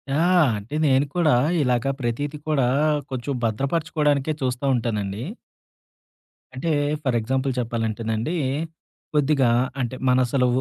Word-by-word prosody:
ఆ! - - +2 0.4
అంటే 105 +8 -7
నేను 135 0 +4
కూడా 170 -4 +3 0.3
ఇలాగా 125 0 +1
ప్రతీది 140 +5 -2
కూడా 140 -5 +2 0.4
కొంచెం 130 +2 -3
భద్రపరచుకోవడానికే 145 +4 0
చూస్తా 125 +1 -1
ఉంటానండి. 105 -3 -2 1.3
అంటే 130 +6 -3 0.3
ఫర్ 130 -4 +1
ఎగ్జాంపుల్ 130 +4 -1
చెప్పాలంటేనండి. 115 +3 -2 0.8
కొద్దిగా 145 -3 +3 0.3
అంటే 125 0 -2
మనసలు 125 0 +3
130 Hz, 100 wpm, -23 LUFS, 115-145 Hz, 1.3 s, నేను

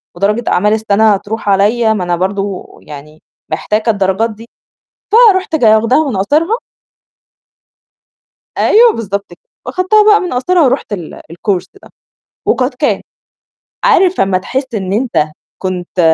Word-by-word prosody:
ودرجة 210 +6 0
أعمال 210 +4 +2
السَنة 220 -1 +2
هتروح 205 +1 -4
عليّا، 220 +3 +2
ما 190 -4 -2
أنا 175 0 -1
برضه 195 +1 -3 0.2
يعني 150 +1 -12 0.3
محتاجة 210 +7 -1
الدرجات 200 +2 0
دي. 225 +2 -13 0.8
فرُحت 375 -4 -1
ج 250 - -1
واخداها 230 +7 +3
من 230 - -3
قاصرها 315 - +1 2.0
أيوه، 460 +1 +5
بالضبط 200 -2 -5
ك - - -14 0.3
وأخدتها 415 +4 +2
بقى 420 0 +5
من 360 - -4
قاصرها 335 +8 +1
ورُحت 260 -5 0
ال 175 -6 -7
الكورس 180 +2 -2 0.2
ده - - -16 0.6
وقد 255 0 0
كان. 290 +3 0 0.8
عارف 380 -6 +3
لمّا 190 -1 +2
تحس 260 +5 -4
إن 190 -2 -3
أنت 200 -10 0 0.3
كنت 185 -1 -4
215 Hz, 135 wpm, -13 LUFS, 190-265 Hz, 2.0 s, أيوه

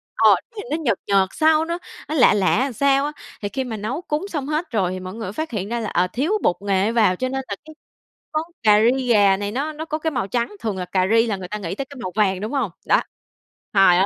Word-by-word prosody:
ờ, - - +5
nó - - -4 0.2
nhìn 415 - -5
nó 305 - +1
nhợt 250 - 0
nhợt 195 -1 +3
sao, 315 0 +3
nó 335 +1 -2 0.3
nó 310 - -1
lạ 255 - +6
lạ 220 +6 +2
sao 275 +3 +2
á. 295 - -2 0.3
Thì 205 - -2
khi 265 +4 -2
mà 235 -4 -5
nấu 230 +10 -3
cúng 305 +1 -2
xong 295 -8 -4
hết 305 +3 -2
rồi 195 -6 +1
thì 185 - -4
mọi 185 0 -7
người 225 0 -6
mới 185 - -5
phát 315 +6 -4
hiện 205 -3 -3
ra 235 +1 -1
là, 220 - -3
ờ, 180 +1 +2
thiếu 290 - 0
bột 175 - +3
nghệ 200 +1 +1
vào 220 -6 +3
cho 255 +7 -2
nên 265 +1 -2
cái 200 - -4 0.8
món 310 +1 +1 0.2
cà 210 -1 +6 0.2
ri 260 -1 -3
gà 205 -4 +5
này 205 0 -3
nó 285 +7 -2
nó 310 +1 -6
có 310 -1 -3
cái 320 0 -1
màu 250 -8 -2
trắng. 235 0 -2
Thường 215 -4 -3
là 180 - -3
cà 185 +1 +1
ri 225 +1 +5
là 205 -3 -1
người 185 - -7
ta 210 - -4
nghĩ 185 -3 -4
tới 275 - -4
cái 280 +1 -13
màu 185 - -3
vàng, 195 -3 +2
đúng 215 - -3
hông? 260 -9 0
Đó, - - +4 0.7
trời 195 -3 +6
ơi! 190 - +4
225 Hz, 280 wpm, -22 LUFS, 195-280 Hz, 0.8 s, lạ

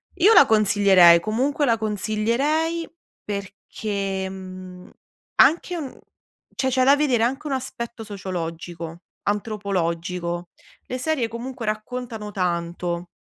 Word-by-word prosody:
io 405 +6 +5
la 285 - +9
consiglierei, 200 -6 +6
comunque 260 - 0
la 230 -3 +3
consiglierei 235 - 0 0.4
perché 200 -1 -4
mhmm, 185 -1 -10 0.5
anche 345 +2 +3
un 295 -6 -6 0.6
cioè 265 0 0
c'è 255 0 +2
da 275 +2 +7
vedere 270 -6 +2
anche 270 +6 -1
un 275 - -1
aspetto 240 -3 -5
sociologico, 170 -4 -6 0.2
antropologico. 180 -4 -2 0.4
Le 255 - -3
serie 260 -2 0
comunque 235 +1 -6
raccontano 220 0 -4
tanto 175 -1 -2
215 Hz, 110 wpm, -23 LUFS, 185-255 Hz, 0.6 s, la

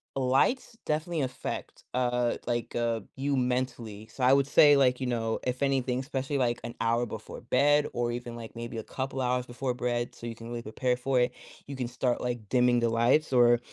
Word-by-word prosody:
lights 135 - +1
definitely 155 +1 -1
affect, 130 -1 -5
uh, 125 -1 +1
like 120 -1 -2
uh 115 -1 0 0.2
you 140 +1 0
mentally, 125 -4 -2
so 125 +3 -6
I 125 - +6
would 140 0 +3
say, 145 0 +7
like, 125 -1 +3
you 130 - -1
know, 115 -2 -1
if 125 +1 -2
anything, 130 -2 +1
especially, 135 +1 -2
like, 120 -2 +1
an 115 - -5
hour 115 +1 +2
before 110 -2 -8
bed, 145 +4 +3
or, 120 0 0
even, 120 -1 -6
like, 115 0 -9
maybe 115 0 -6
a 110 - -4
couple 135 +2 -4
hours 125 0 0
before 125 +1 -3
bed 120 -1 -2
so - - -10
you 115 -1 -5
can 115 +1 -10
really 120 0 -4
prepare 125 +3 -1
for 130 +1 +1
it, 125 0 +2 0.3
you 140 - -6
can 125 -2 -3
start, 125 0 -1
like, 120 -3 -3
dimming 125 -1 +4
the 120 0 +2
lights, 120 +6 +2
or 120 -1 +6
125 Hz, 205 wpm, -29 LUFS, 120-130 Hz, 0.3 s, say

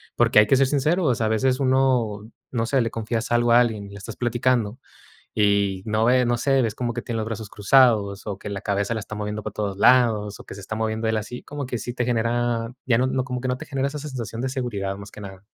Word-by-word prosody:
Porque - - +5
hay 105 - +5
que - - +4
ser 135 0 +4
sinceros, 150 -1 +1
a 110 - +1
veces 125 +5 +1
uno 125 -5 +1 0.2
no 115 -2 0
sé, 135 +3 +1
le 115 -1 -1
confías 115 +1 -3
algo 120 0 +3
a 120 - +7
alguien, 110 -4 0
y - - -12
le 100 - -10
estás 105 +2 -8
platicando 120 -1 0 0.5
y, 100 -2 +2
no 110 0 +1
ve, 125 +2 +4
no 120 0 +2
sé, 135 +2 +2
ves 115 -2 -1
como 120 -1 -2
que 120 - -4
tiene 115 - -5
los 110 - -2
brazos 110 -2 -5
cruzados, 105 -3 +3
o 100 -2 -3
que 105 - -7
la 100 -1 -4
cabeza 100 +2 -1
la 110 - -2
está 105 - -7
moviendo 105 0 -4
para 110 - -5
todos 100 -3 -3
lados, 110 -3 +4
o - - -14
que - - -10
se 100 - -9
está 110 - -5
moviendo 110 0 -1
él 110 - +1
así, 110 +3 -4
como 145 -1 -6
que 125 -1 -3
sí 120 +2 -5
te 125 - -1
genera, 120 0 0 0.2
ya 120 -3 +3
no, 130 0 +1
como 125 -1 -4
que 130 - -4
no 125 0 -1
te - - -9
genera 135 -1 -1
esa 150 +1 -5
sensación 120 -6 -5
de 130 - -1
seguridad, 100 -7 -3
más 100 0 -10
que 105 - -12
nada. 95 0 -10
115 Hz, 260 wpm, -23 LUFS, 105-125 Hz, 0.5 s, a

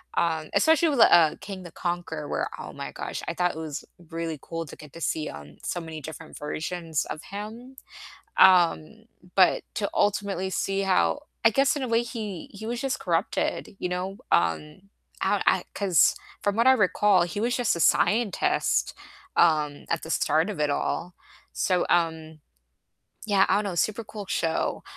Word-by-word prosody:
um, 160 -2 0
especially 320 +1 +4
with, 275 -5 0
uh, 165 -3 +6
King 190 -2 -7
the 175 - -10
Conqueror 175 -4 -4
where - - -2
oh - - -8
my - - -6
gosh, - - -5
I 170 - -2
thought 180 -1 0
it - - -8
was 155 -3 -6 0.2
really 165 -2 -4
cool 165 0 -5
to 145 - -11
get 150 -2 -14
to 165 - -10
see, 155 0 -1
um, 75 0 -11
so 175 - -2
many 160 -2 -8
different 160 +2 -9
versions 160 +1 -3
of 155 - -6
him, 220 +6 -8 0.6
um, 185 +3 +4 0.3
but 185 -2 +4
to 200 - -2
ultimately 200 -2 0
see 195 +1 -1
how 85 - +2 0.2
I 225 - +7
guess 275 +5 +2
in 285 - -2
a 255 - -2
way 230 0 +2
he 220 -7 -6
he 215 +2 -8
was 240 +1 -3
just 270 -2 -1
corrupted, 175 +3 -1
you 180 - -2
know? 185 +2 -3 0.2
Um, 150 - 0 0.3
I - - +1
I - - +3
'cause 190 -5 +3 0.3
from 205 +1 0
what 230 - +3
I 260 - +8
recall, 205 -4 +3
he 175 +4 -3
was 240 +2 0
just 245 -7 +1
a - - -4
scientist, 215 +5 +2 0.4
um, 150 -3 +2
at 165 - -1
the 160 - -8
start 160 +4 +2
of 205 - -6
it 150 -1 +2
all. 175 +4 -2 0.4
So, 180 -2 +1
um 160 -2 0 0.9
yeah, 200 -2 +4
I - - +4
don't 210 - 0
know, 195 -3 -3
super 215 +6 0
cool 210 -1 -8
show, 165 -3 -1
180 Hz, 180 wpm, -26 LUFS, 160-210 Hz, 0.9 s, I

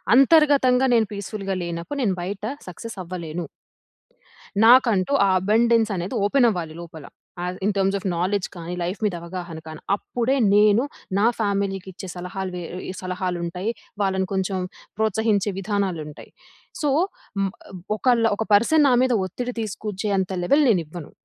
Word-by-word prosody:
అంతర్గతంగా 275 -2 +5
నేను 225 -2 +3
పీస్ఫుల్‌గా 200 -1 -4
లేనప్పుడు, 170 +11 -4
నేను 195 -5 +1
బయట 195 +3 -5 0.3
సక్సెస్ 225 +5 -8
అవ్వలేను. 170 -2 -5 1.2
నాకంటూ 235 -2 +5
ఆ - - +3
అబండెన్స్ 225 +3 +3
అనేది 180 +7 -3
ఓపెన్ 245 +4 +4
అవ్వాలి 170 -6 -3
లోపల. 160 -3 -10 0.4
ఆహ్, 180 +1 -3
ఇన్ 210 - +2
టర్మ్స్ 195 0 +2
ఆఫ్ - - -14
నాలెడ్జ్ 185 +2 0
కానీ, 170 0 -6
లైఫ్ 180 +3 -3
మీద 200 -4 0
అవగాహన 170 -1 -6
కానీ. 155 -1 -8
అప్పుడే 245 +5 -1 0.2
నేను 210 +3 +5 0.3
నా 205 - +3
ఫ్యామిలీకిచ్చే 195 -2 -2
సలహాలు 185 +1 -5
వే 180 - -4 0.3
ఇ - - -2
సలహాలుంటాయి. 180 +1 -3 0.3
వాళ్ళని 190 -1 +1
కొంచెం 190 0 -1 0.4
ప్రోత్సహించే 220 -1 +1
విధానాలుంటాయి. 185 -7 -3 0.5
సో, 295 - +1 0.5
మ్ 195 -1 0 0.2
ఆహ్, - - -9 0.2
ఒకళ్లు 235 -1 +3
ఒక 220 - -1
పర్సన్ 290 +9 +5
నా - - +4
మీద 260 -1 +2
ఒత్తిడి 245 +7 -4
తీసుకొచ్చేంత 200 -2 -2
లెవెల్ 280 +11 +4
నేనివ్వను. 170 -5 -1
195 Hz, 140 wpm, -23 LUFS, 180-225 Hz, 1.2 s, అంతర్గతంగా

